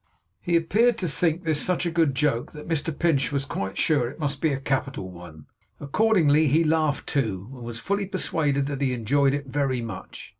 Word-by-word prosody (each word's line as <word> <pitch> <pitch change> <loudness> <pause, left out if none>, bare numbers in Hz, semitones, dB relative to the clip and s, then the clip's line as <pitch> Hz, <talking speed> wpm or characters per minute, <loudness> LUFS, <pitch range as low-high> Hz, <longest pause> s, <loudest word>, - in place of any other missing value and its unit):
He 175 - 0
appeared 215 +9 +3
to 185 -6 -2
think 165 +3 0
this 155 -2 +1
such 180 0 +1
a 170 - 0
good 165 -5 +2
joke, 130 -4 0
that 150 -1 -10
Mr 165 -1 0
Pinch 145 -6 +1
was 140 -1 -1
quite 95 -7 -4
sure 140 -7 +2
it 130 - -11
must 145 -3 -3
be 160 - +2
a 135 - -2
capital 135 -8 -2
one. 85 -4 -12 0.3
Accordingly, 155 -2 +3
he 155 +5 +3
laughed 155 -2 +1
too, 110 -5 -2
and 125 - -11
was 115 -1 -6
fully 200 - -1
persuaded 150 -7 0
that 140 -1 -4
he 130 -2 +1
enjoyed 135 +4 +2
it 145 0 -4
very 135 -3 -1
much. 110 -5 -8
145 Hz, 200 wpm, -25 LUFS, 130-165 Hz, 0.3 s, appeared